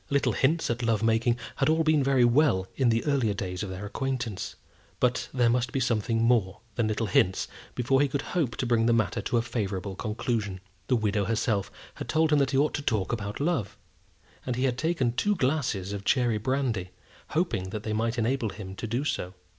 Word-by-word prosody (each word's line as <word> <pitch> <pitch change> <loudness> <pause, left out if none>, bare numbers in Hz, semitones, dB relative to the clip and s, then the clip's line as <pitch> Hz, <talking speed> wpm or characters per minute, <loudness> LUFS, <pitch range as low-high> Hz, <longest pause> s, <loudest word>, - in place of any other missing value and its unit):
Little 140 -1 +2
hints 155 +1 +1
at 120 +1 -2
love 115 -2 +1
making 115 +1 +2 0.2
had - - +2 0.2
been 155 0 +4
all - - +2
very 130 -2 +4
well 120 -7 +3
in 130 -3 +3
the 115 0 +1
earlier 130 -8 +1
days 90 -2 -4
of 100 - -3
their 95 +2 -6
acquaintance; 120 -2 -3 0.4
but 125 0 +1
there 125 -2 +2
must 120 0 +1
be 135 - -1
something 115 -2 +1
more 115 -6 +2
than 110 +1 0
little 110 +1 -1
hints 95 -1 +2 0.3
before 135 +3 +2
he 145 - +4
could 140 +1 -2
hope 150 -9 0
to - - -2
bring 115 -1 +2
the 120 - +4
matter 110 -5 +1
to 120 - 0
a 115 - +2
favourable 100 -4 -3
conclusion. 105 -2 -2 0.3
The 130 - +3
widow 105 -3 +1
herself 105 -2 0 0.2
had - - -8
told 160 0 +2
him 150 - +5
that 140 - +2
he 135 - 0
ought 150 +2 +2
to - - -2
talk 110 -8 0
about 105 -2 -4
love; 145 - -1 0.7
and 125 - -2
he 125 - -1
had 130 -3 +2
taken 160 -7 +1
two 205 - +1
glasses 130 - 0
of 100 -1 -5
cherry 120 -2 +2
brandy, 120 -6 -1 0.4
hoping 160 - 0
that 105 +1 -5
they 110 - -2
might 115 +2 0
enable 120 0 0
him 95 -2 -8
to 115 - -4
do 120 +5 -1
so. 95 -10 -3
115 Hz, 210 wpm, -27 LUFS, 105-135 Hz, 0.7 s, him